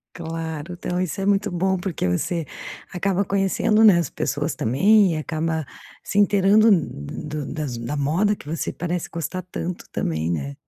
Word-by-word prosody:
Claro 165 Hz, 0 st, -5 dB
então 180 Hz, +1 st, -3 dB
isso 185 Hz, +2 st, -2 dB
é -, -, -1 dB
muito 205 Hz, +1 st, +2 dB
bom 190 Hz, +2 st, 0 dB
porque 180 Hz, -, -2 dB
você 160 Hz, -, -1 dB, 0.5 s
acaba 195 Hz, +2 st, 0 dB
conhecendo, 200 Hz, +3 st, +2 dB
né, 205 Hz, -6 st, +8 dB
as 165 Hz, -6 st, -1 dB
pessoas 145 Hz, +2 st, -2 dB
também 195 Hz, -, +4 dB
e -, -, -2 dB
acaba 160 Hz, +1 st, -2 dB, 0.4 s
se 205 Hz, -, -2 dB
inteirando 205 Hz, +2 st, +5 dB
do 150 Hz, -, -1 dB
das 145 Hz, -6 st, -4 dB
da 120 Hz, +5 st, -4 dB
moda 170 Hz, +9 st, +1 dB
que -, -, -15 dB
você 160 Hz, +3 st, -2 dB
parece 175 Hz, -1 st, -3 dB
gostar 170 Hz, +2 st, -4 dB
tanto 180 Hz, 0 st, -5 dB
também, 80 Hz, 0 st, -1 dB
né? 70 Hz, -4 st, -3 dB
170 Hz, 165 wpm, -23 LUFS, 150-195 Hz, 0.5 s, né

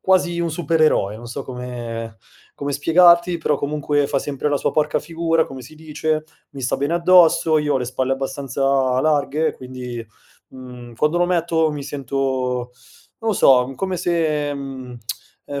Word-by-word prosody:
quasi 180 Hz, -2 st, +2 dB
un 170 Hz, -1 st, -1 dB
supereroe, 155 Hz, -, +1 dB
non 120 Hz, -, -10 dB
so 125 Hz, +3 st, -6 dB
come 120 Hz, -3 st, -6 dB, 0.4 s
come 140 Hz, 0 st, -4 dB
spiegarti 170 Hz, +4 st, +4 dB
però, 150 Hz, -2 st, 0 dB
comunque 145 Hz, 0 st, 0 dB
fa 140 Hz, -, 0 dB
sempre 145 Hz, +1 st, -3 dB
la 145 Hz, -, +1 dB
sua -, -, 0 dB
porca 155 Hz, -, +1 dB
figura, 165 Hz, 0 st, 0 dB
come 130 Hz, -1 st, -9 dB
si 130 Hz, -, -13 dB
dice, 155 Hz, 0 st, -2 dB, 0.3 s
mi 140 Hz, -, -9 dB
sta 125 Hz, -, 0 dB
bene 145 Hz, +3 st, -1 dB
addosso, 170 Hz, -2 st, +5 dB
io 150 Hz, -1 st, 0 dB
ho 135 Hz, -, +2 dB
le 125 Hz, -, -2 dB
spalle 130 Hz, +1 st, -1 dB
abbastanza 135 Hz, 0 st, -3 dB, 0.4 s
larghe 150 Hz, +1 st, +1 dB
quindi, 125 Hz, -2 st, -7 dB, 0.4 s
mhmm, 125 Hz, -2 st, -11 dB
quando 150 Hz, +8 st, +1 dB
lo 175 Hz, -, +3 dB
metto 165 Hz, -2 st, +1 dB
mi 145 Hz, -1 st, -5 dB
sento 130 Hz, -3 st, -2 dB, 0.5 s
non 225 Hz, -1 st, -1 dB
lo -, -, +2 dB
so 130 Hz, -6 st, +5 dB
come 190 Hz, +1 st, -2 dB
se, 155 Hz, -4 st, 0 dB
mhmm, 130 Hz, -3 st, -7 dB, 0.5 s
ehm 140 Hz, -1 st, -5 dB
145 Hz, 165 wpm, -21 LUFS, 130-160 Hz, 0.5 s, addosso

